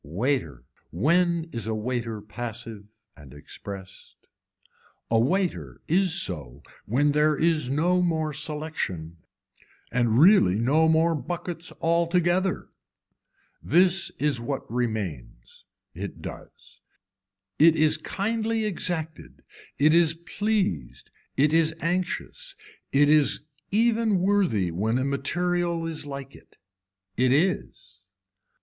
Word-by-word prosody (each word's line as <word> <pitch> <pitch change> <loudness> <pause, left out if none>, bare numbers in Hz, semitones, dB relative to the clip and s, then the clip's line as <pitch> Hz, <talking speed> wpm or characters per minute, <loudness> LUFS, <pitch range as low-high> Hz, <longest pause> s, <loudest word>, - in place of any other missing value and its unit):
Waiter, 85 - -2 0.3
when 170 - +2
is 115 -3 -4
a 110 - -1
waiter 115 -1 -3
passive 115 -1 -7 0.3
and 70 -3 -14
expressed, 95 +6 -10 0.9
a 115 - +4
waiter 180 - -1
is 180 +1 +2
so 75 - -4 0.2
when 145 +7 +2
there 150 0 +2
is 160 -5 +1
no 175 +6 +2
more 160 -3 0
selection 150 - -4 0.7
and 120 -2 +1
really 155 - +6
no 140 +9 +3
more 160 +1 +3
buckets 170 +2 -5
altogether. 175 +2 +1 0.9
This 180 +2 +3
is 140 -4 0
what 135 +3 -3
remains. 105 - -4 0.3
It - - -7
does. - - -11 0.8
It 160 +1 +6
is 155 0 +2
kindly 220 +5 -2
exacted, 170 -5 -3 0.3
it 155 +2 +4
is 165 -1 +4
pleased, 170 - -2 0.3
it 150 +3 +3
is 160 0 +4
anxious, 185 - -3 0.4
it 145 +1 +4
is 150 -1 +4 0.3
even 225 -1 +2
worthy 180 - +1
when 110 +8 0
a 130 - -1
material 170 +4 -1
is 160 -3 -5
like 140 -2 -7
it. - - -19 0.6
It 125 +1 +3
is. 140 - -1
155 Hz, 110 wpm, -25 LUFS, 115-175 Hz, 0.9 s, really